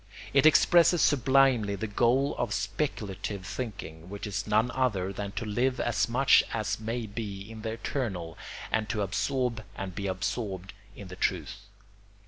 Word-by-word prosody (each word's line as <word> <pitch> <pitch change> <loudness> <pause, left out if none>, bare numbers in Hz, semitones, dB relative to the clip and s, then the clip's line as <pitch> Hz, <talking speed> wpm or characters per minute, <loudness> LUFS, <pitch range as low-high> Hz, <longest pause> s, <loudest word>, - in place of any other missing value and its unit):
It 140 +2 +6
expresses 170 +2 +5
sublimely 130 -7 +4
the 100 - -3
goal 120 +6 +2
of - - 0
speculative 100 -8 -3
thinking; 90 -6 -6
which 100 +2 -6
is 100 0 -3
none 110 +4 +2
other 100 -8 0
than 100 +1 -4
to 110 +2 -3
live 125 +5 0
as 120 0 +1
much 130 +3 +5
as 110 -2 -2
may 115 +2 -3
be 100 -2 -5
in 110 -1 -9
the 110 0 -3
eternal 100 - -3 0.4
and 110 -1 0
to 105 - 0
absorb 120 +4 -1
and 95 -2 -5
be 100 +1 -3
absorbed 95 0 -3 0.2
in 100 -3 -10
the 90 - -8
truth. 90 -1 -1
110 Hz, 155 wpm, -29 LUFS, 100-125 Hz, 0.4 s, It